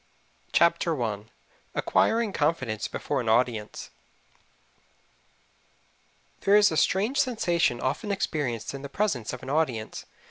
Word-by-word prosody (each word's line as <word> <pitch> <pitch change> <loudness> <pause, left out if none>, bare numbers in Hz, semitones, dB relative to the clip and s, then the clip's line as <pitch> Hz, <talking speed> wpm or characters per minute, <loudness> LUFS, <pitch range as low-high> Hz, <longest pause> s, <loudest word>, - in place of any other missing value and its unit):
CHAPTER 170 -2 +3
I 105 -2 -3 0.5
ACQUIRING 225 -3 +2
CONFIDENCE 130 -9 0
BEFORE - - -2
AN 115 - -2
AUDIENCE 115 -2 0 2.5
There 200 - +4
is 210 -2 +6
a - - -1
strange 210 - +2
sensation 175 - +1
often 200 - -2
experienced 145 - -2
in 140 - -6
the 140 - -7
presence 140 - -1
of 125 0 -8
an 130 - -5
audience. 130 -8 -1
150 Hz, 115 wpm, -27 LUFS, 120-195 Hz, 2.5 s, is